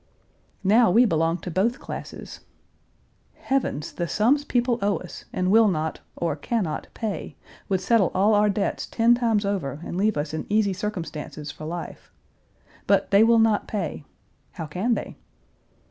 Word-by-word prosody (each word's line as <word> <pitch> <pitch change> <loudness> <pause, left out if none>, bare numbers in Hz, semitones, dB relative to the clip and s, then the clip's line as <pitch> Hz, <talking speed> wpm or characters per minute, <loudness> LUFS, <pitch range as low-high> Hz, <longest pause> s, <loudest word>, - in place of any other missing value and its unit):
Now 220 +3 +5
we 235 +7 +5
belong 165 -3 +1
to 180 - -5
both 210 +9 +1
classes. - - -8 1.0
Heavens! 260 - -2
the 175 - -3
sums 240 - +2
people 245 -3 0
owe 200 0 +1
us 180 - -10
and 185 0 0
will 225 +1 +6
not, 160 -4 -1 0.2
or 165 -4 -1
can 220 +9 -1
not, 155 -3 -4
pay, 220 -4 -4 0.3
would 190 -2 +1
settle 210 -3 +3
all 200 +4 +4
our 210 0 +4
debts 200 0 -1
ten 230 +1 +3
times 230 -4 +1
over 170 -8 -2
and 175 - -5
leave 210 0 +1
us 145 +1 -3
in 160 - -4
easy 205 -2 +2
circumstances 165 -6 -5
for 155 +1 -10
life. 170 +2 -7 0.8
But 200 -1 +2
they 200 +2 +6
will 230 +1 +5
not 225 -2 +3
pay. 180 -8 -3 0.5
How 165 - -5
can 190 +10 0
they? - - -6
200 Hz, 160 wpm, -24 LUFS, 170-225 Hz, 1.0 s, will